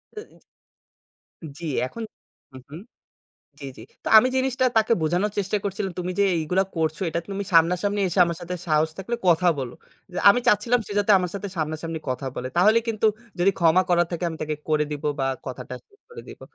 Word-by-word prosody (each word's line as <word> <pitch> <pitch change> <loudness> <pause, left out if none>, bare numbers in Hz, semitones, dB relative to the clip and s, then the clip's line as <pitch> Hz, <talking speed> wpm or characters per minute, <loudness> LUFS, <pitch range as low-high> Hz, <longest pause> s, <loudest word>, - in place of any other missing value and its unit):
অ্যা 425 - -7
is. - - -23 1.2
জি 170 - -7 0.2
এখন 230 - -7 0.5
হুম, 130 - -11
হুম। 155 +4 -9 0.8
জি, - - -9
জি। - - -11 0.2
তো - - -2
আমি 255 - +4
জিনিসটা 260 0 0
তাকে 220 +1 +3
বোঝানোর 175 +6 +1
চেষ্টা 200 +1 0
করছিলাম, 195 -1 -3
তুমি 180 +1 -3
যে - - +5
এইগুলা 180 +5 +1
করছো 160 0 -1
এটা 170 +1 -2
তুমি 200 0 -4
সামনাসামনি 180 +5 +3
এসে 185 - -3
আমার 170 -1 -3
সাথে 180 +1 -5
সাহস 155 0 +2
থাকলে 235 +5 -3
কথা 175 +1 +3
বলো। 125 -2 -5 0.4
যে - - -8
আমি 245 - +2
চাচ্ছিলাম 230 +4 +3
সে - - -7
যাতে 205 +1 +3
আমার 180 -2 -3
সাথে 200 0 -4
সামনাসামনি 160 +1 -3
কথা 130 +1 -3
বলে। 130 - -4
তাহলে 215 +6 +5
কিন্তু 220 0 +1 0.3
যদি 190 +3 +4
ক্ষমা 170 +2 +4
করার 175 -1 +3
থাকে 170 +1 -3
আমি 160 - -6
তাকে 155 0 -2
করে 150 -1 +2
দিবো 150 +1 -3
বা 135 - +1 0.2
কথাটা 125 0 -7
শেষ 410 - -28
করে 470 - -10
দিব। - - -12
180 Hz, 195 wpm, -24 LUFS, 160-205 Hz, 1.2 s, যে